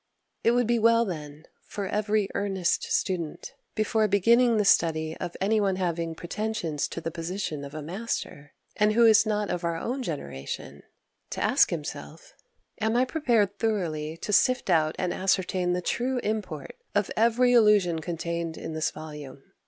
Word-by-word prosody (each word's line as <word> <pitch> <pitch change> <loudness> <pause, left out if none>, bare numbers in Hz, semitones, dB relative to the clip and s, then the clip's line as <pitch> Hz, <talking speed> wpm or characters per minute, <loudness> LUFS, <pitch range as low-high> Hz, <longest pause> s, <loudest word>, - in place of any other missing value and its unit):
It 230 - +4
would 245 0 +2
be 235 +1 +2
well, 230 +1 +4
then, 155 -4 -7 0.2
for 200 - -4
every 210 0 0
earnest 195 -3 -1
student, 170 -5 -2 0.2
before 215 0 +1
beginning 230 +4 +4
the 210 - +2
study 160 -3 +2
of 175 - -6
any 210 +3 +2
one 195 -2 +1
having 170 -3 -2
pretensions 175 -4 -3
to 170 - -6
the 165 - -4
position 165 -2 -4
of 140 +1 -9
a 155 - -5
master, 165 -5 -5 0.2
and 210 0 +3
who 235 +1 +5
is 220 -1 +6
not 210 -1 0
of 175 - -3
our 170 -1 -1
own 255 +10 -3
generation, 70 - -6 0.5
to - - -3
ask - - +4
himself, 175 - -7 0.5
"Am 220 +1 0
I 250 +1 +4
prepared 235 -8 +1
thoroughly 165 -8 -1
to 210 - -4
sift 250 -2 +3
out 155 -2 +2
and 180 -1 -1
ascertain 185 -1 0
the 180 0 -2
true 250 +7 -1
import 205 -9 -4 0.2
of 205 -1 +1
every 235 +3 +3
allusion 205 -8 +4
contained 170 -1 -4
in - - -6
this 155 -1 0
volume?" 150 -3 -9
190 Hz, 165 wpm, -27 LUFS, 165-220 Hz, 0.5 s, is